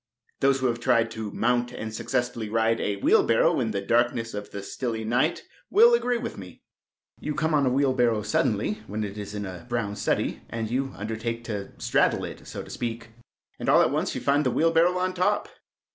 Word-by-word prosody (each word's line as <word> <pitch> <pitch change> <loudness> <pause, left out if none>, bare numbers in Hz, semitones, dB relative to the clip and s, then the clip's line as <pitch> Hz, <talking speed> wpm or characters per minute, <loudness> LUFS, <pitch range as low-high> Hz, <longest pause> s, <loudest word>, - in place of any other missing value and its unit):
Those 135 0 +3
who - - 0
have 120 -1 +1
tried 115 -2 +2
to 110 -2 -5
mount 120 +3 0
and 110 0 -6
successfully 120 -1 -2
ride 115 +1 +1
a 100 - 0
wheelbarrow 100 - +3
in - - 0
the 100 - -2
darkness 115 +1 +1
of 105 0 -6
the 100 - -7
stilly 110 +1 -4
night 125 +9 +1 0.3
will 465 +4 +6
agree 250 - +2
with 235 - -5
me. 90 -3 -12 0.6
You 150 - -3
come 160 +1 0
on 145 -3 +3
a - - +4
wheelbarrow 125 -5 +2
suddenly 105 0 0
when 105 +2 -3
it 100 -1 -5
is 105 0 -6
in 105 0 -3
a 95 +4 -8
brown 115 -4 -2
study, - - -1
and 115 -1 -4
you 135 +2 -1
undertake 110 +3 -4
to 105 -4 -5
straddle - - +2
it, - - -9
so - - -6
to - - -13
speak, 115 -1 -4 0.5
and - - -2
all - - +6
at - - +1
once - - -1
you - - -3
find 145 +1 +2
the 130 - +2
wheelbarrow 165 +5 +3
on 185 0 0
top. 185 +3 +1
115 Hz, 205 wpm, -26 LUFS, 110-135 Hz, 0.6 s, will